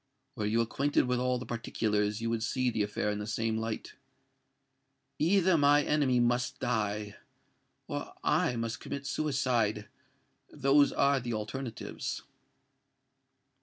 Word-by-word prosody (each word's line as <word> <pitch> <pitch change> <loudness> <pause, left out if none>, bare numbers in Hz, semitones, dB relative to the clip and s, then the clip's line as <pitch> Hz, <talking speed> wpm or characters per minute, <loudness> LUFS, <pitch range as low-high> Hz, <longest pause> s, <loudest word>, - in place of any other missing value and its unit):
Were 105 - -2
you 115 +2 +2
acquainted 140 +5 +1
with 125 0 0
all 125 0 +1
the 125 - -6
particulars, 105 -2 -1
you 115 0 -1
would 115 -1 -1
see 125 +2 0
the 110 - -1
affair 105 0 -1
in 105 - -3
the 105 - -5
same 110 0 -1
light. 110 0 -4 1.3
Either 180 +1 +4
my 145 +1 +5
enemy 140 -5 +2
must 120 +1 +1
die—or 105 -3 -5
I 125 - +2
must 115 -1 -3
commit 140 0 -6
suicide! 125 -9 0 0.6
Those 140 +2 +4
are 140 0 +3
the 120 -2 -3
alternatives." 115 +3 -5
120 Hz, 130 wpm, -30 LUFS, 110-135 Hz, 1.3 s, my